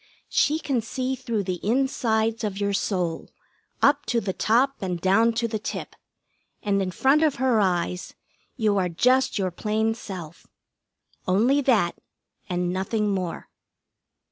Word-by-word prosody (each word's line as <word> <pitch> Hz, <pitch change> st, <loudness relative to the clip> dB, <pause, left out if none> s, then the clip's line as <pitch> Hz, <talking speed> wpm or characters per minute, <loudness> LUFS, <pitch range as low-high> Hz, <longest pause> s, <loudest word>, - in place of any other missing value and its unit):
She 300 Hz, +2 st, +2 dB
can 275 Hz, -6 st, -1 dB
see 255 Hz, +4 st, -3 dB
through 230 Hz, -4 st, -2 dB
the 185 Hz, -2 st, -4 dB
insides 225 Hz, -2 st, +1 dB
of 205 Hz, -2 st, -3 dB
your 200 Hz, 0 st, 0 dB
soul, 180 Hz, -5 st, -1 dB, 0.5 s
up 285 Hz, 0 st, +4 dB
to 235 Hz, -, +1 dB
the 195 Hz, -4 st, -3 dB
top 255 Hz, +8 st, +2 dB
and 180 Hz, -3 st, -2 dB
down 200 Hz, +6 st, +4 dB
to 230 Hz, +1 st, 0 dB
the 220 Hz, -1 st, -3 dB
tip, -, -, -6 dB, 0.7 s
and 200 Hz, -1 st, +1 dB
in 190 Hz, -, -1 dB
front 270 Hz, -, +3 dB
of 310 Hz, -3 st, +3 dB
her 250 Hz, -3 st, +2 dB
eyes 180 Hz, -2 st, -1 dB, 0.4 s
you 215 Hz, -5 st, +1 dB
are 180 Hz, -1 st, 0 dB
just 255 Hz, +9 st, +2 dB
your 190 Hz, -2 st, 0 dB
plain 220 Hz, +4 st, 0 dB
self. 180 Hz, -8 st, -9 dB, 0.8 s
Only 235 Hz, +10 st, +3 dB
that, 225 Hz, -10 st, +2 dB, 0.5 s
and 180 Hz, 0 st, -1 dB
nothing 205 Hz, +3 st, -1 dB
more. 185 Hz, -3 st, -4 dB
215 Hz, 145 wpm, -25 LUFS, 185-245 Hz, 0.8 s, up